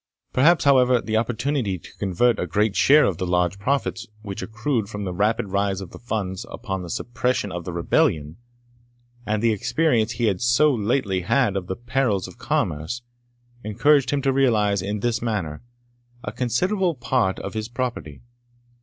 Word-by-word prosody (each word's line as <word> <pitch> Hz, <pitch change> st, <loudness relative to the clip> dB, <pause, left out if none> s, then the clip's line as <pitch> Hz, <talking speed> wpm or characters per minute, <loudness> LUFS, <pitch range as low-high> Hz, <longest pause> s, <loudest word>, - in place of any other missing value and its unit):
Perhaps, 160 Hz, +6 st, +4 dB
however, 130 Hz, -3 st, +5 dB
the 110 Hz, -1 st, -3 dB
opportunity 120 Hz, -2 st, 0 dB
to 80 Hz, -, -15 dB
convert 100 Hz, +5 st, +2 dB
a 90 Hz, -, -2 dB
great 105 Hz, +3 st, +1 dB
share 150 Hz, +2 st, +6 dB
of 90 Hz, -4 st, -1 dB
the 95 Hz, -, -2 dB
large 90 Hz, +2 st, +1 dB
profits 115 Hz, -1 st, -1 dB, 0.2 s
which 100 Hz, -2 st, -6 dB
accrued 110 Hz, -1 st, -2 dB
from 105 Hz, -2 st, -5 dB
the 90 Hz, -2 st, -3 dB
rapid 105 Hz, +2 st, 0 dB
rise 100 Hz, 0 st, 0 dB
of 95 Hz, -3 st, -8 dB
the -, -, -11 dB
funds 100 Hz, -6 st, -3 dB
upon 95 Hz, -1 st, -5 dB
the 90 Hz, -, -8 dB
suppression 120 Hz, 0 st, -1 dB
of 90 Hz, -1 st, -5 dB
the 90 Hz, -, -4 dB
rebellion, 80 Hz, -2 st, 0 dB, 0.9 s
and 105 Hz, +1 st, 0 dB
the 115 Hz, -, +4 dB
experience 115 Hz, +1 st, +1 dB
he 115 Hz, +1 st, -1 dB
had 95 Hz, -4 st, 0 dB
so 120 Hz, +5 st, +4 dB
lately 105 Hz, -4 st, 0 dB
had 105 Hz, +3 st, +1 dB
of 95 Hz, -2 st, -3 dB
the 95 Hz, -, -3 dB
perils 120 Hz, -4 st, -1 dB
of -, -, -14 dB
commerce, 80 Hz, +11 st, -2 dB, 0.6 s
encouraged 135 Hz, +5 st, +3 dB
him 140 Hz, -2 st, 0 dB
to 135 Hz, -1 st, +2 dB
realise, 105 Hz, -7 st, +2 dB
in 100 Hz, +2 st, -3 dB
this 120 Hz, 0 st, 0 dB
manner, 95 Hz, -10 st, -3 dB, 0.6 s
a -, -, -4 dB
considerable 175 Hz, -, 0 dB
part 125 Hz, -6 st, 0 dB
of 100 Hz, -, -6 dB
his 110 Hz, +1 st, -4 dB
property. 120 Hz, -, -4 dB
110 Hz, 170 wpm, -23 LUFS, 95-125 Hz, 0.9 s, share